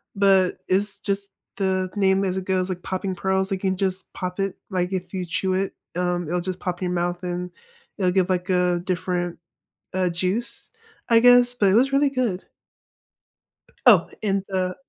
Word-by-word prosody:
but 195 -2 +4
it's 195 +2 0
just 200 0 -2 0.3
the 190 -1 0
name 195 -1 +3
as 185 -1 -1
it 190 - -4
goes, 185 -1 0
like 180 -1 -4
popping 185 0 -3
pearls. 190 +1 0
You 195 - -1
can 190 0 0
just 190 -1 -2
pop 180 0 -5
it, 195 -1 -1
like, 185 -1 -1
if 185 +1 -4
you 185 -1 -2
chew 185 +2 -1
it, 190 +1 -1 0.2
um, 180 0 0
it'll 175 +2 -1
just 185 0 -4
pop 180 0 -4
in 185 - 0
your 180 - -1
mouth, 175 0 -1
and 180 0 -3 0.5
it'll 185 -2 +2
give, 185 -1 +2
like, 180 0 -1
a 180 -1 +2
different, 180 -1 -2 0.6
uh, 185 -1 +1
juice, 185 +7 -2 0.4
I 230 -1 +6
guess. 245 0 +6
But 205 -5 +3
it - - +3
was 260 +5 +4
really 280 +1 +3
good. 245 -9 -1 1.4
Oh, - - +7
in 195 -2 0
the 185 -1 -1
185 Hz, 185 wpm, -23 LUFS, 180-195 Hz, 1.4 s, Oh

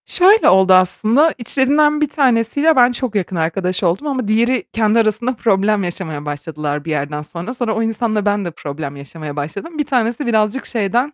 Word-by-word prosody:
Şöyle 395 +4 +4
oldu 190 0 +5
aslında, 220 - +3
içlerinden 290 +5 +2
bir 300 - +2
tanesiyle 275 +3 +2
ben 245 -1 +5
çok 245 -2 -4
yakın 190 -2 -2
arkadaş 180 +3 -2
oldum 180 - 0
ama 260 -6 -2
diğeri 235 +4 +1
kendi 220 0 +2
arasında 230 +3 0
problem 210 -2 +1
yaşamaya 165 -4 -5
başladılar 145 0 -5
bir 165 - -4
yerden 150 0 -3
sonra. 170 +9 -7
Sonra 240 -4 -2
o 225 - 0
insanla 225 -2 -1
ben 205 -1 0
de 175 - -4
problem 145 -2 -7
yaşamaya 145 +1 -9
başladım. 200 - -6
Bir 295 - -1
tanesi 245 0 -1
birazcık 220 +2 0
şeyden 240 +6 -1
215 Hz, 180 wpm, -17 LUFS, 170-250 Hz, -, oldu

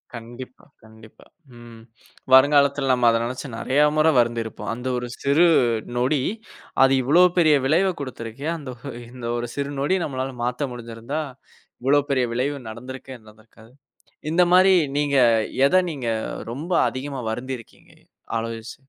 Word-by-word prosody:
கண்டிப்பா 120 +2 -10 0.2
கண்டிப்பா, 110 0 -17 0.3
ம். 115 -1 -13 0.5
வருங்காலத்துல 140 0 +5
நம்ம 125 -2 +3
அத 115 - +3
நெனச்சு 125 +4 -5
நறையா 145 +5 +2
முறை 155 +1 +4
வருந்திருப்போம். 115 -1 -2
அந்த 125 +2 -6
ஒரு 125 0 -4
சிறு 145 +5 +4 0.5
நொடி, 130 +3 +1 0.6
அது 135 0 +4
இவ்வளோ 165 +8 +5
பெரிய 155 -3 +5
விளைவைக் 175 +5 +1
கொடுத்து 130 -3 -7
இருக்கே! 125 +7 -7
அந்த 140 -4 -8
ஒ - - -26 0.3
இந்த 125 -1 -9
ஒரு 120 - -3
சிறு 140 0 -3
நொடி 150 +7 +1
நம்மளால 130 -2 -4
மாத்த 125 +3 -2
முடிஞ்சிருந்தா, 120 +5 -5 0.6
இவ்வளவு 145 +2 +2
பெரிய 130 -2 +2
விளைவு 140 +4 -1
நடந்திருக்கவே 130 +3 -9
நடந்திருக்காது. 110 +2 -19 0.6
இந்த 180 +2 +4
மாரி 185 +1 +6 0.2
நீங்க 145 -1 +1 0.5
எத 185 - 0 0.2
நீங்க 130 -6 -5 0.4
ரொம்ப 155 +9 -6 0.2
அதிகமா 135 0 -6
வருந்திருக்கீங்க? 125 0 -8 0.5
ஆலோசி 115 0 -6
130 Hz, 135 wpm, -23 LUFS, 120-145 Hz, 0.6 s, மாரி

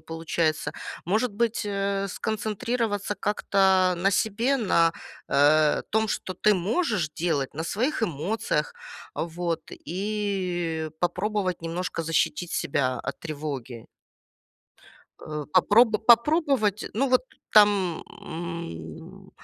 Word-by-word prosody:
получается. 160 -2 -1 0.3
Может 215 +5 +1
быть, 230 +2 0
э, 200 -1 -1
сконцентрироваться 215 0 -2
как-то 190 -3 +3
на 195 +3 +2
себе, 230 +7 +1
на, 170 -7 +3 0.4
э, 150 +2 +4
том, 220 +1 +1
что 185 - -3
ты 210 +4 +3
можешь 195 - 0
делать 155 -6 -1
на 160 +3 -3
своих 235 - -1
эмоциях. 210 - -1 0.4
Вот. 170 0 -3
И 180 -4 -2
попробовать 185 0 -1
немножко 165 0 -3
защитить 165 +1 0
себя 130 -2 0
от - - -5
тревоги. 140 -7 -6 1.3
Э, 150 -1 -5
попроб 215 +3 +4
попробовать, 240 - +4
ну, 270 +5 +1
вот, 255 0 +4 0.3
там, 200 -5 +4 0.2
м, 160 - -7
185 Hz, 100 wpm, -26 LUFS, 165-215 Hz, 1.3 s, э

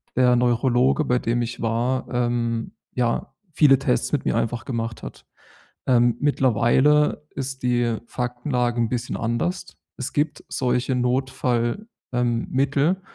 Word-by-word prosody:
der 125 -1 +4
Neurologe, 125 +3 +2
bei 125 -1 +2
dem 120 0 0
ich 120 0 -4
war, 120 +3 -1
ähm, 120 -1 -1 0.2
ja, 120 -2 -1 0.2
viele 140 -4 +5
Tests 60 - 0
mit - - -1
mir - - +1
einfach 120 +1 -1
gemacht 115 -2 -4
hat. - - -10 0.6
Ähm, 120 -2 +3
mittlerweile 145 +3 +3
ist 135 -1 -5
die 120 -2 +1
Faktenlage 125 0 -2
'n 115 -2 +1
bisschen 125 -1 -3
anders. 120 +11 -1 0.3
Es 130 - -5
gibt 150 0 -1
solche 125 0 0
Notfall, 125 - 0 0.3
ähm, 120 -2 0
Mittel. 140 +7 +1
125 Hz, 130 wpm, -23 LUFS, 120-135 Hz, 0.6 s, viele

